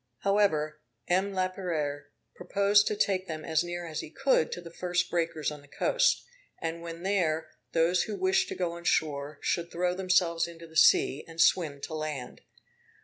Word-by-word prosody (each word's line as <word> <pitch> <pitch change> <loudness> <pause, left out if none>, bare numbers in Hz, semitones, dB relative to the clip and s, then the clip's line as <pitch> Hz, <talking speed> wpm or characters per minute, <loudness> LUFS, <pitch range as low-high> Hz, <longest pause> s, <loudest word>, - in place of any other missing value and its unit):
However, 155 -7 +1 0.3
M. 190 +3 +1
Laperere 175 -6 -2 0.3
proposed 205 +1 +3
to 210 - 0
take 190 -2 0
them 155 -1 -5
as 160 0 +1
near 175 0 -5
as 160 -1 -5
he - - -6
could 270 - +2
to - - -4
the 170 -1 -11
first 180 0 -1
breakers 165 -3 -1
on 150 -1 -9
the 145 - -19
coast; - - +2 0.4
and 165 0 -4
when 170 0 -7
there, 160 -5 0 0.2
those 170 +2 +3
who 215 - -3
wished 375 0 +2
to - - -4
go 180 -2 -1
on 170 0 -9
shore 145 -3 0
should 170 -1 -1
throw 180 +1 0
themselves 180 -3 +2
into 170 0 -11
the 160 -1 -16
sea, 150 -2 +5
and 165 0 -12
swim 155 -5 +3
to 160 - -6
land. 155 -4 -5
170 Hz, 180 wpm, -29 LUFS, 155-185 Hz, 0.4 s, sea